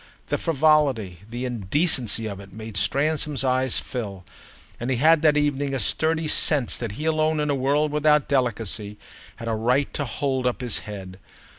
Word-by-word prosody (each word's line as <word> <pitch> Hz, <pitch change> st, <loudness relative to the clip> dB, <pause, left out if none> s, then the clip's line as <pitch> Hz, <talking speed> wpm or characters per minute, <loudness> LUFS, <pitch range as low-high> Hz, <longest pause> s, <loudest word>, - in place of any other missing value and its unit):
The -, -, 0 dB
frivolity, 140 Hz, -, +2 dB
the 120 Hz, +2 st, -4 dB
indecency 120 Hz, -, 0 dB
of 100 Hz, -3 st, -5 dB
it 100 Hz, -1 st, -12 dB
made 110 Hz, +1 st, -9 dB
Stransom's 145 Hz, +5 st, +1 dB
eyes 130 Hz, 0 st, +1 dB
fill; 100 Hz, -7 st, -5 dB, 0.6 s
and 120 Hz, -, -3 dB
he 130 Hz, -, +1 dB
had 155 Hz, +5 st, +4 dB
that 150 Hz, -2 st, +4 dB
evening 145 Hz, -2 st, 0 dB
a -, -, -1 dB
sturdy 160 Hz, +11 st, +1 dB
sense 145 Hz, -4 st, +2 dB
that 115 Hz, -4 st, -4 dB
he 150 Hz, +9 st, -5 dB
alone, 155 Hz, -1 st, +1 dB
in 150 Hz, -1 st, 0 dB
a -, -, +2 dB
world 145 Hz, +3 st, +1 dB
without 150 Hz, 0 st, +3 dB
delicacy, 115 Hz, -6 st, -1 dB, 0.4 s
had 115 Hz, -, -8 dB
a 115 Hz, -, 0 dB
right 125 Hz, +6 st, +1 dB
to 145 Hz, -, -2 dB
hold 130 Hz, +1 st, -1 dB
up 125 Hz, -, -2 dB
his 120 Hz, -4 st, -2 dB
head. 95 Hz, -2 st, -8 dB
130 Hz, 175 wpm, -24 LUFS, 110-150 Hz, 0.6 s, had